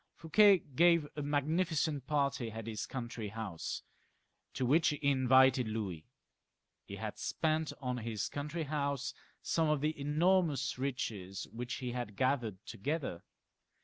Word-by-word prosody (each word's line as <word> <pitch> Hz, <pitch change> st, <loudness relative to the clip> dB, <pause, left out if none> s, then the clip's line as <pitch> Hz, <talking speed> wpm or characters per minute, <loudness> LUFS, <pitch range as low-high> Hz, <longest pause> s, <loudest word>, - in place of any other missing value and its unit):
Fouquet 200 Hz, +5 st, +6 dB, 0.2 s
gave 170 Hz, -1 st, +5 dB
a 150 Hz, -, -3 dB
magnificent 150 Hz, 0 st, 0 dB
party 140 Hz, -5 st, 0 dB
at 110 Hz, 0 st, -6 dB
his 110 Hz, -3 st, -4 dB
country 120 Hz, -4 st, -5 dB
house, 105 Hz, -5 st, -5 dB, 0.7 s
to 130 Hz, -, -2 dB
which 150 Hz, +6 st, +4 dB
he 150 Hz, -, 0 dB
invited 130 Hz, -2 st, +5 dB
Louis. 100 Hz, -8 st, -4 dB, 0.8 s
He -, -, -7 dB
had -, -, -5 dB
spent 160 Hz, -1 st, 0 dB
on 125 Hz, -2 st, -2 dB
his 115 Hz, -3 st, -3 dB
country 150 Hz, +3 st, -4 dB
house 140 Hz, -2 st, -2 dB, 0.3 s
some 160 Hz, -2 st, +1 dB
of 150 Hz, -1 st, +2 dB
the 155 Hz, +1 st, 0 dB
enormous 150 Hz, -2 st, +2 dB
riches 110 Hz, -8 st, -3 dB
which 120 Hz, +2 st, -4 dB
he 125 Hz, -2 st, -4 dB
had 120 Hz, -4 st, -4 dB
gathered 120 Hz, -6 st, 0 dB
together. 140 Hz, -, -3 dB
135 Hz, 135 wpm, -33 LUFS, 115-155 Hz, 0.8 s, Fouquet